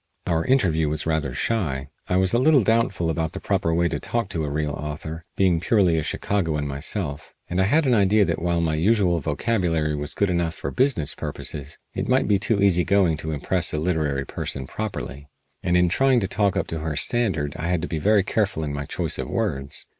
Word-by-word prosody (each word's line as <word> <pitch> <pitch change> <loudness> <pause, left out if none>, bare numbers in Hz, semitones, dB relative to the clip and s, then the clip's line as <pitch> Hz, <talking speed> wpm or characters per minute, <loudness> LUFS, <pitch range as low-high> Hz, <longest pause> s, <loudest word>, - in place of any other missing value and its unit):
Our 80 0 +1
interview 85 - +2
was 75 0 -3
rather 80 -4 0
shy. 70 - -2 0.2
I 90 - +1
was 95 -1 +2
a 120 - +4
little 140 -2 +5
doubtful 110 -7 +1
about 80 0 -2
the - - -5
proper 95 -5 0
way 85 +1 +2
to - - -3
talk 115 -4 -2
to 80 -4 -3
a 75 - -2
real 75 +1 -1
author, 75 +2 -6
being 90 -4 +3
purely 90 -3 +2
a - - 0
Chicagoan 80 -3 -1
myself, 70 +2 -4
and 90 +2 0
I - - +3
had 150 +9 +3
an 130 - +3
idea 105 -1 +4
that - - -2
while 85 0 +1
my 80 -2 0
usual 90 +1 +2
vocabulary 80 -1 0
was 75 0 -3
good 100 -2 +1
enough 85 -2 -1
for - - -5
business 125 - +1
purposes 70 +1 -5 0.2
it - - -3
might 130 +1 +3
be 100 -2 +3
too 110 0 +1
easy 90 -3 +4
going 95 -3 +3
to 80 +1 -4
impress 85 +4 -1
a - - -1
literary 75 -4 -1
person 70 -1 -4
properly, 70 - -6 0.3
and 90 0 +2
in 90 0 +4
trying 130 +7 +3
to 95 - 0
talk 100 -2 0
up - - 0
to 80 - -3
her 80 -1 -3
standard 80 - +2
I 80 - -3
had 85 -2 0
to - - -2
be 80 - -3
very 105 +4 +3
careful 100 -5 0
in 75 -2 -3
my 70 0 -4
choice - - -1
of 65 - -4
words. 75 -10 -2
85 Hz, 220 wpm, -23 LUFS, 75-100 Hz, 0.3 s, little